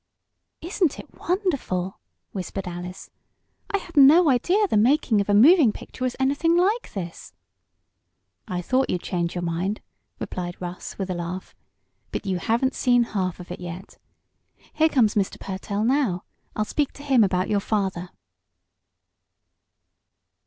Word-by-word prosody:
"Isn't 345 -2 0
it - - -11
wonderful?" 280 - -1 0.3
whispered 195 0 -5
Alice. 180 +1 -7 0.6
"I 400 - +1
had 350 -3 -11
no 295 +3 +7
idea 355 - +2
the - - -1
making 230 -1 +3
of 200 - -4
a - - +4
moving 280 - +7
picture 255 - -9
was 255 -1 -1
anything 285 +6 +2
like 410 +7 +1
this!" 175 -4 -7 1.1
"I 180 -3 -3
thought 255 +6 +1
you'd 180 - -1
change 170 -2 -2
your 175 - -2
mind," 175 +5 -2 0.4
replied 175 -1 -5
Russ, 180 0 -7
with 190 -2 -3
a - - 0
laugh. 175 +2 -5 0.6
"But - - -4
you 185 -2 -1
haven't 240 +8 +1
seen 245 -2 +3
half 185 -3 -1
of 175 0 -10
it 180 - -6
yet. 180 +2 -8 0.7
Here 315 +1 +3
comes 235 -8 +3
Mr. 200 -2 -1
Pertell 200 +2 -3
now. 240 -8 +1 0.3
I'll 215 - 0
speak 290 +5 -1
to 285 - -12
him 265 -5 +4
about 185 -2 +1
your 205 - +1
father." 195 -4 -2
210 Hz, 145 wpm, -24 LUFS, 180-280 Hz, 1.1 s, no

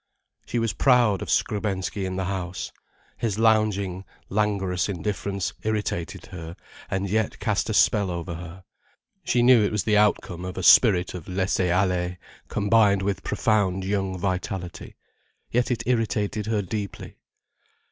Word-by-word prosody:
She 120 - -2
was 115 -4 0
proud 120 -5 +3
of - - -5
Skrebensky 100 -2 -1
in 95 - -4
the 95 0 -2
house. 90 -1 -4 0.5
His 110 -4 -2
lounging, 105 -4 +2 0.3
languorous 100 -3 0
indifference 100 0 -3
irritated 105 -6 -3
her 85 -2 -8 0.3
and 95 +1 -1
yet 110 +1 0
cast - - -1
a - - 0
spell 100 -3 +3
over 85 0 -4
her. 90 +2 -9 0.6
She 120 - +2
knew 120 -3 +6
it 105 - 0
was 105 -4 0
the 105 +2 +3
outcome 90 -4 +1
of 90 0 -6
a 95 - -3
spirit 95 -3 +6
of 90 -4 -8
laisser 95 -1 0
aller 90 -1 0 0.3
combined 105 -2 +3
with 100 -1 -1
profound 95 -4 +1
young 95 -1 -1
vitality. 90 -1 -4 0.6
Yet 120 +1 +1
it 125 - -1
irritated 110 -3 0
her 110 -2 0
deeply. 100 0 -6
100 Hz, 145 wpm, -25 LUFS, 90-105 Hz, 0.6 s, knew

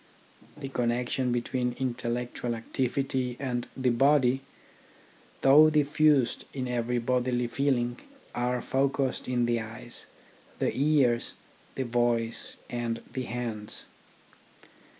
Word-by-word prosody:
The 145 -2 -5
connections 125 +1 0
between 125 0 -1
intellectual 120 -1 -2
activity 125 +1 -1
and 125 -3 -2
the 130 -2 +2
body, 135 +1 +4 1.0
though 150 +3 +8
diffused 150 -3 +3
in 130 -2 -2
every 120 0 0
bodily 125 0 +1
feeling, 120 0 0 0.3
are 125 0 -1
focussed 135 0 0
in 125 -1 +1
the 120 0 +1
eyes, 115 +2 -6 0.5
the - - 0
ears, 135 -5 +2 0.4
the 135 - -1
voice, 120 -1 0
and 120 -1 -3
the 130 -1 -3
hands. 115 -3 -3
125 Hz, 105 wpm, -28 LUFS, 120-135 Hz, 1.0 s, though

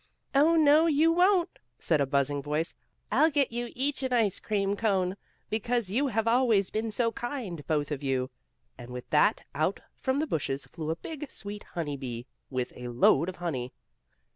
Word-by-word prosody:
"Oh, 300 +4 +5
no 310 +1 +6
you 315 +1 +4
won't," 360 +1 +3 0.2
said 155 -4 +1
a 140 - +1
buzzing 140 +1 +1
voice. 150 +3 -1 0.4
"I'll 315 - +5
get 280 -5 +1
you 240 0 -3
each 275 +2 -1
an 260 -1 -2
ice 225 -6 +2
cream 200 -2 0
cone, 195 -4 +1 0.4
because 230 -2 0
you 270 +7 +2
have 225 -3 0
always 230 -5 +3
been 220 +1 -1
so 230 +2 +1
kind 230 - -5
both 150 -1 0
of 145 -2 -3
you." 130 -2 -1 0.5
And 120 - -9
with 125 0 -7
that 150 - +3
out 155 +7 0 0.2
from 260 0 0
the 305 - +1
bushes 140 - -2
flew 160 -2 -6
a 160 - 0
big, 295 - -7
sweet, 205 -3 -7
honey 155 -5 -4
bee, 120 -3 -6 0.2
with 130 -2 -3
a 125 - -7
load 135 +7 +3
of 185 - -6
honey. 135 -9 -4
200 Hz, 185 wpm, -29 LUFS, -, 0.5 s, no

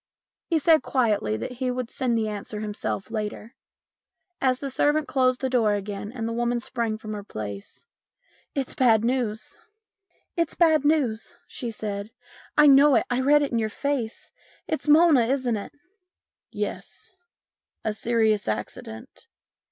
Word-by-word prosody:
He 330 - +2
said 315 0 +4
quietly 210 - 0
that 115 - -5
he 250 +1 -3
would 250 -1 -3
send 245 -3 0
the 220 -1 0
answer 210 0 -5
himself 210 0 -4
later. 215 +1 -5 0.9
As 255 -1 +2
the 275 +1 -5
servant 295 +3 +1
closed 255 -1 +1
the 265 - +1
door 230 -5 +2
again 205 0 -5 0.2
the 230 - -2
woman 240 +1 0
sprang 230 -2 -2
from 215 -1 -7
her 205 -1 -6
place. 105 - -8 0.3
" - - -37
It's 265 - -3
bad 230 -4 +3
news," 235 -4 -2 1.9
she 245 -5 -5
said. 210 -2 -5 0.2
" - - -23
I 300 - +7
know 280 0 +7
it - - +3
I 245 +1 +1
read 295 +2 +4
it 285 - -2
in 235 - +1
your 220 -1 -1
face. 255 -1 -3 0.4
It's 315 - -3
Mona, 300 -6 +6
isn't 255 -3 0
it? 205 - -6 0.3
" 365 - -61
" - - -69
Yes. - - -6 0.7
A 215 - 0
serious 220 -1 +1
accident. 110 +1 -6
235 Hz, 150 wpm, -25 LUFS, 210-265 Hz, 1.9 s, I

